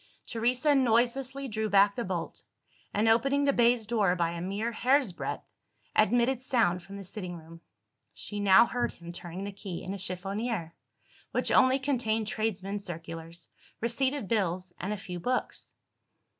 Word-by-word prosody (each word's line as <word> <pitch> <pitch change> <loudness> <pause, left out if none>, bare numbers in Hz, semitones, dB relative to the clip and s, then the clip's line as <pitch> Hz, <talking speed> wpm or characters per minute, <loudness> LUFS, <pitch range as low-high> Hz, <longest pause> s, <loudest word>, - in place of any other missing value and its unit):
Teresa 250 +6 +1
noiselessly 260 +2 +1
drew 220 -2 -2
back 200 0 +5
the 240 - -2
bolt; 180 -4 -4 0.5
and, 210 +2 +1
opening 275 +6 +3
the 280 -1 +3
baize 235 -2 +3
door 210 -5 +2
by 170 -2 0
a 170 0 -5
mere 200 +6 -2
hair's 255 0 +2
breadth, 170 - -5 0.5
admitted 240 +4 +3
sound 225 -9 +2
from 200 +3 -10
the 200 - -7
sitting 180 -2 -5
room. 165 +1 -13 0.5
She 205 - -6
now 205 +3 +7
heard 245 +1 -2
him 170 0 -10
turning 175 +2 -6
the 200 - -4
key 195 -3 -7
in 185 - -4
a 200 - -6
chiffonier, 195 0 -3 0.6
which - - +1
only 260 0 +5
contained 240 -5 0
tradesmen's 205 -2 -2
circulars, 165 -1 -7 0.3
receipted 260 +1 -1
bills, 185 -4 -1
and 190 - -3
a 210 - -2
few 180 -2 -7
books. 250 +9 -2
210 Hz, 155 wpm, -29 LUFS, 185-240 Hz, 0.6 s, now